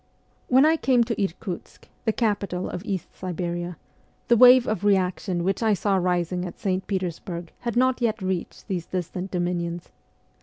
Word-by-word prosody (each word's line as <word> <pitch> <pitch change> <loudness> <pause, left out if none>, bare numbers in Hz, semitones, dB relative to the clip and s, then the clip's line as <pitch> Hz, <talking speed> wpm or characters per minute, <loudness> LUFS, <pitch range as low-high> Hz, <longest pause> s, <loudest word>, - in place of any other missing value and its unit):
When 260 +3 +5
I 320 +1 +4
came 255 -5 +3
to 230 -3 -1
Irkutsk, 180 -1 -6 0.2
the 220 - +3
capital 205 -5 -1
of 175 - -5
East 195 -5 -4
Siberia, 175 -1 -4 0.5
the 240 - +6
wave 250 +1 +8
of 215 -3 -1
reaction 185 -2 +1
which 195 +4 0
I 220 -2 +3
saw 200 +1 +1
rising 180 -1 0
at 180 - -6
St. 190 -1 -2
Peters 185 -4 -2
burg 170 -2 -7
had 235 -1 -3
not 255 0 +3
yet 230 -1 +1
reached 185 -2 -4
these 180 -5 -3
distant 180 +1 -4
dominions. 175 -1 -2
190 Hz, 165 wpm, -25 LUFS, 175-220 Hz, 0.5 s, wave